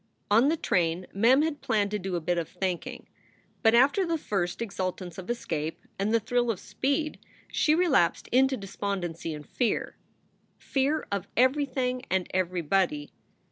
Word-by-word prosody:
On 230 +6 +6
the 330 - +1
train 175 - 0
Mem 245 +8 +5
had 310 -2 -2
planned 215 -6 +1
to 210 - -1
do 190 -1 -3
a - - 0
bit 175 +2 0
of 165 - -4
thinking. 185 -3 -4 0.6
But 225 -1 +5
after 280 +10 +5
the 335 -2 0
first 175 - -2
exultance 185 -5 -4
of 185 - -9
escape 165 -10 -3
and 200 +2 +1
the 230 - +4
thrill 245 +2 0
of 220 - -1
speed 285 +3 -1 0.3
she 305 - +3
relapsed 305 - +2
into 265 +1 +3
despondency 190 -5 -4
and 150 0 -10
fear 240 -4 -1 0.6
fear 285 +3 0
of 200 -3 -2
everything 255 -1 +2
and 190 -1 +1
everybody. 180 -4 0
210 Hz, 155 wpm, -28 LUFS, 180-265 Hz, 0.6 s, On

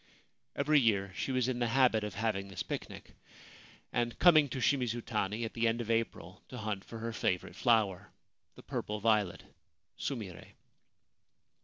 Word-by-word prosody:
Every 150 +1 +4
year 100 -6 +1
she 135 - -3
was 130 -1 +1
in 125 -1 -1
the 120 - +1
habit 120 -3 +3
of 105 -2 -5
having 105 -3 -1
this 95 - -5
picnic, - - -7 0.8
and 120 0 0
coming 155 -5 +6
to 135 - -4
Shimizu 120 -3 +1
tani 105 +1 -1
at 110 - -6
the 115 0 +1
end 115 +1 +1
of 115 -1 -2
April 115 0 -2
to 125 - -7
hunt 105 -4 -3
for 115 - -9
her 115 +1 -4
favourite 90 -4 -1
flower, 100 -6 +2 0.5
the - - -13
purple 105 0 -3
violet 105 -4 +1 0.6
(sumire). 105 - -5
115 Hz, 160 wpm, -32 LUFS, 105-125 Hz, 0.8 s, coming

